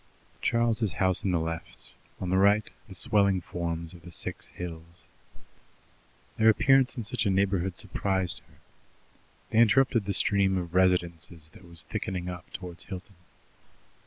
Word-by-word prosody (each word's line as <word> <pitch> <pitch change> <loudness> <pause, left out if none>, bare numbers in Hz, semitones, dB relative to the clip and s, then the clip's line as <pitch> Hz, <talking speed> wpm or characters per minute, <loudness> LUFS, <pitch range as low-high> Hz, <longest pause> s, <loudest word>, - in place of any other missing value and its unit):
Charles's 115 -3 +1
house 95 -2 +1
on 100 - 0
the 90 -2 +2
left; 80 +1 -6 0.3
on 90 -1 -3
the 95 - +3
right 100 +2 +4 0.2
the 95 - -10
swelling 100 0 +2
forms 85 -1 -4
of 85 - -13
the 85 0 -12
Six - - -4
Hills. 85 -1 -9 1.3
Their 110 0 +6
appearance 135 +4 +4
in 120 - -3
such 115 0 0
a - - +3
neighbourhood 95 -1 +1
surprised 95 -2 -1
her. - - -23 1.0
They 110 - +3
interrupted 115 -1 +4
the 100 - -1
stream 95 0 +4
of 85 -2 -4
residences 85 -3 +1
that 90 - -15
was 85 -1 -3
thickening 95 -4 -4
up 90 -2 -8
towards 90 -2 -6
Hilton. 95 +1 -8
95 Hz, 150 wpm, -28 LUFS, 85-105 Hz, 1.3 s, Their